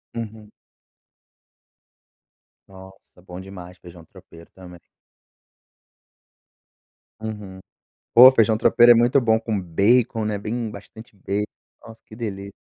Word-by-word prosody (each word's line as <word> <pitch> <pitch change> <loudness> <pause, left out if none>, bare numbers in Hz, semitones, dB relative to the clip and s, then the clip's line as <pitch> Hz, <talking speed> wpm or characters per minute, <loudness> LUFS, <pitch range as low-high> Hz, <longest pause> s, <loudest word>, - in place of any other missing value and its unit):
Uhum. 110 -2 -8 2.2
Nossa, 95 -1 -18
bom 90 0 -11
demais 90 -2 -12
feijão 85 -2 -15
tropeiro 85 +1 -18
também. 90 -2 -14 2.4
Uhum, 105 -4 -8 0.6
pô, 125 +2 +9
feijão 110 -3 +2
tropeiro 120 +1 +5
é - - +4
muito 120 +4 +2
bom 110 -2 +1
com 110 -3 -4
bacon, 110 +6 0
né, 105 -1 -3
bem 110 +2 -5
bastante 105 +2 -14
bacon, 100 +2 -3 0.4
nossa, 115 0 -15
que 110 - -15
delícia, 100 -4 -7
105 Hz, 110 wpm, -21 LUFS, 95-115 Hz, 2.4 s, pô